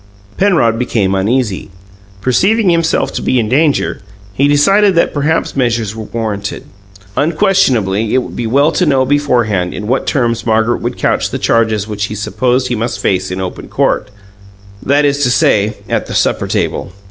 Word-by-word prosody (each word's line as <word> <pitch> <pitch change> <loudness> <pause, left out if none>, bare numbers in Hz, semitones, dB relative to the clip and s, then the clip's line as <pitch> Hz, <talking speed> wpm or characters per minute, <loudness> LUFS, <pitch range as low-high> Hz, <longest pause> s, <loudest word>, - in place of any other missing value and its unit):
Penrod 160 - +2
became 105 -6 0
uneasy. 105 +1 -1 0.5
Perceiving 190 - +2
himself 165 -1 0
to - - -3
be 130 - +1
in 110 - 0
danger, 145 +1 +1 0.3
he 140 +8 +2
decided 195 +7 +3
that 170 - +2
certain 150 +3 0
measures 115 -4 0
were 110 -1 -6
warranted. 105 -4 -4 0.5
Unquestionably, 130 - +1
it 130 - +2
would - - -9
be 120 - -3
well 140 +7 +3
to 180 0 0
know 135 -2 +2
beforehand 120 -10 0
in 105 - -5
what 130 +5 -1
terms 120 -4 0
Margaret 110 +1 +1
would 120 +1 -3
couch - - 0
the - - -3
charges 110 -3 +1
which 105 -1 -3
he 105 - -6
supposed 125 +5 -1
he 120 - 0
must 115 +1 -3
face 95 -2 0
in 90 +1 -4
open 95 -1 -6
court 105 - 0 0.7
that 145 +2 +2
is 140 0 +1
to 125 - +2
say, 105 -3 +2
at - - -2
the - - -5
supper - - 0
table. - - -2
120 Hz, 170 wpm, -14 LUFS, 110-145 Hz, 0.7 s, decided